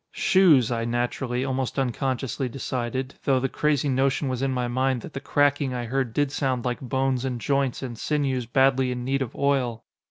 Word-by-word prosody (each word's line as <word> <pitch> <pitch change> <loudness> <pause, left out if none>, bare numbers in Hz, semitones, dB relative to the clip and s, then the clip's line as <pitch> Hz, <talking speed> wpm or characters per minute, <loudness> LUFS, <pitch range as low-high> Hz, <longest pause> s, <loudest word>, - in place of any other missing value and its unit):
"Shoes," 155 - +4
I 115 -1 -1
naturally, 120 +2 -1
almost 130 -1 -2
unconsciously 130 0 -1
decided, 130 +1 -3
though 135 -2 +3
the 135 - 0
crazy 145 +1 0
notion 135 +1 +1
was 130 -1 -2
in 135 - +1
my 125 -2 -1
mind 130 0 0
that 155 - -9
the - - -4
cracking 145 -1 +1
I 120 -1 -3
heard 130 0 -1
did 145 +3 0
sound 130 -4 -1
like 125 -1 -2
bones 130 0 0
and 125 -2 -2
joints 135 +3 0
and 125 -3 -5
sinews 135 -2 -1
badly 130 +1 +3
in 125 -1 -4
need 135 +1 0
of 130 - -4
oil. 130 -5 0
130 Hz, 190 wpm, -25 LUFS, 125-135 Hz, -, Shoes